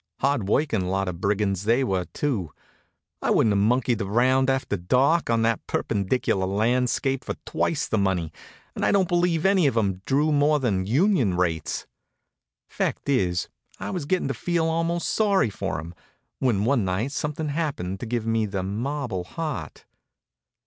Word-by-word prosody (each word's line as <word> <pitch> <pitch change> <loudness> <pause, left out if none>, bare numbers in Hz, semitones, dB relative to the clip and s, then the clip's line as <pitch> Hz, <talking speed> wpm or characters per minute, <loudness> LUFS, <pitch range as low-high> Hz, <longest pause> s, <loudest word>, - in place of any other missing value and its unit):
Hard 135 -7 +1
working 110 -6 +1
lot 95 +1 -1
of 90 -1 -5
brigands 100 -2 0
they 120 +5 +3
were, 95 -7 0
too. 105 - -2 0.7
I - - 0
wouldn't 110 - +3
have 100 0 +2
monkeyed 120 0 +1
around 130 +6 +2
after 135 -5 0
dark 130 - +2
on 115 -1 +2
that 115 -1 0
perpendicular 100 -2 0
landscape 125 +6 +1
for - - -4
twice 160 -1 -1
the 110 - 0
money, 90 -5 0 0.4
and - - -4
I - - +3
don't 195 -3 +3
believe 175 -1 +1
any 190 -5 +4
of 115 - 0
'em 95 -4 0
drew 145 +3 +2
more 150 +1 +3
than 95 -8 0
union 130 - +2
rates. 80 -4 -1 0.8
Fact - - -3
is, 90 -10 +1 0.3
I - - -4
was 180 -6 -3
getting 180 -4 0
to - - 0
feel 170 +6 0
almost 165 +1 0
sorry 200 - +2
for 95 -1 -3
'em, 85 +2 -8 0.5
when 110 -6 +1
one 125 -3 +2
night 95 +8 -1
something 150 +2 -3
happened 140 - -2
to 120 - -5
give 115 -1 -2
me 115 -1 +1
the 95 -2 -3
marble 115 0 -3
heart. 140 - -5
120 Hz, 165 wpm, -25 LUFS, 95-145 Hz, 0.8 s, any